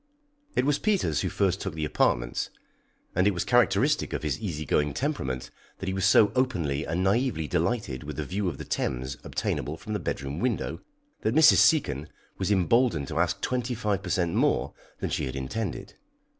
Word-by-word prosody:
It - - +2
was 145 0 +2
Peters 195 - +1
who - - -1
first 95 -1 0
took 95 -5 -4
the 80 -1 -2
apartments, - - 0 0.7
and 90 +3 +3
it 100 - +2
was 85 - -1
characteristic - - +3
of - - -3
his 75 -2 -1
easy 80 -7 -4
going 75 +1 +1
temperament 65 - -2 0.3
that - - -6
he 95 - 0
was 95 0 0
so 105 0 +6
openly 85 - 0
and 90 +4 -1
naïvely 100 - +1
delighted 85 - -1
with - - -6
the - - -2
view 95 +1 -1
of - - -6
the - - -7
Thames 65 +1 -2
obtainable 75 +3 -2
from 110 - -6
the 105 - -1
bedroom 70 -3 -3
window, 125 -2 -1 0.4
that 110 +4 0
Mrs. 160 0 +7
Seacon 75 - +3 0.3
was 95 +1 0
emboldened 95 - +2
to 80 - -2
ask 90 -1 +1
twenty 125 -1 -1
five 105 -4 -1
per 95 - -6
cent 85 -1 +1
more - - +1 0.3
than - - -2
she - - -1
had 65 0 -5
intended. 85 +12 -4
90 Hz, 190 wpm, -27 LUFS, 75-110 Hz, 0.7 s, Mrs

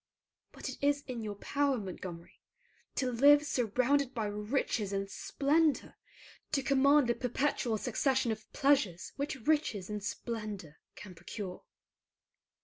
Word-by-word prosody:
But - - -7
it - - -5
is 285 0 +2
in 250 -3 -5
your 210 -2 -4
power, 280 +5 0
Montgomery, 185 -4 -8 0.5
to 255 -2 0
live 290 +5 +6
surrounded 260 +1 +1
by 225 -3 -1
riches 210 0 -1
and 195 0 -1
splendor, 295 +8 +1 0.6
to 275 - +2
command 280 +1 +5
the 240 - +2
perpetual 250 -2 0
succession 255 +2 +1
of 215 -1 -6
pleasures 270 - +2
which 280 -4 -4
riches 255 -11 +1
and 210 -1 -4
splendor 210 -8 -5 0.2
can 190 -2 -10
procure. 180 +2 -7
240 Hz, 130 wpm, -32 LUFS, 210-280 Hz, 0.6 s, live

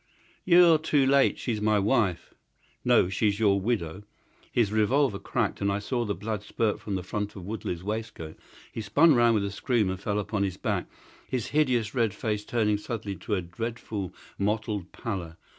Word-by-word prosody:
"You're 175 -3 +7
too 150 -3 +2
late. 135 0 +4
She's 110 -4 -3
my 105 0 +3
wife!" 100 -3 +1 0.5
"No, - - +4
she's 100 +2 0
your 100 -3 +3
widow." 95 -5 -2 0.5
His 110 -4 +2
revolver 110 +1 +2
cracked, - - -2
and 100 0 +1
I 100 - 0
saw 120 +4 -2
the 100 -2 -2
blood 105 +2 -4
spurt 105 0 -1
from 100 - -3
the 95 - -3
front 105 +2 -4
of 95 -3 -8
Woodley's 95 -4 -4
waistcoat. 105 -7 -5 0.4
He 115 - -5
spun 145 +11 +5
round 120 -2 +4
with 100 -2 +1
a 100 - -3
scream 105 -1 0
and 95 - -5
fell 105 +1 -2
upon 105 0 -2
his 95 -2 -1
back, - - -2 0.4
his 125 -4 -2
hideous 125 -8 +1
red 115 -5 +1
face 105 -2 -2
turning 105 -2 +1
suddenly 105 -2 -4
to 105 +5 -2
a 90 - -2
dreadful 105 0 -5 0.3
mottled 105 -2 -1
pallor. 90 -7 -5
105 Hz, 180 wpm, -27 LUFS, 100-115 Hz, 0.5 s, You're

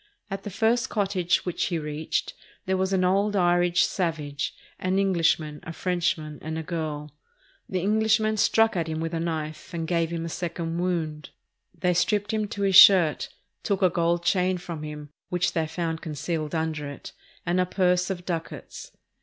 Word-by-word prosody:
At 195 0 -3
the 205 - -6
first 225 +4 +1
cottage 195 -4 0
which 180 - -1
he 175 - -1
reached, 150 0 -3 0.3
there 190 - +1
was 190 +1 0
an 190 -1 +2
old 200 +3 +2
Irish 175 -1 +3
"savage," 150 -6 -2 0.2
an 185 +1 0
Englishman, 165 -6 +1
a - - -7
Frenchman, 165 -3 -1
and 160 +1 -4
a 160 - -3
girl. 155 -3 -4 0.6
The 185 -2 -1
Enghshman 215 +1 +2
struck 225 +1 +3
at 165 -2 -1
him 160 0 -3
with 165 +1 -3
a 165 - -1
knife 160 +1 -4
and 165 -1 -3
gave 165 -1 +1
him 165 -1 -3
a - - -3
second 170 0 -3
wound. 160 -4 -2 0.5
They 180 +2 +2
stripped 205 +4 +1
him 215 -1 0
to 200 0 -4
his 195 -1 +2
shirt, 180 -5 +7 0.3
took 200 -2 -1
a 185 - +5
gold 170 0 +1
chain 185 +1 +2
from 170 -3 -7
him, 150 -1 -7 0.2
which 180 -1 0
they 160 -1 0
found 165 0 -3
concealed 155 0 -3
under 160 -2 -2
it, 140 - -9 0.3
and 175 +2 +2
a 180 - 0
purse 180 -1 +2
of 180 -2 -4
ducats. 165 -3 -6
175 Hz, 180 wpm, -26 LUFS, 160-190 Hz, 0.6 s, shirt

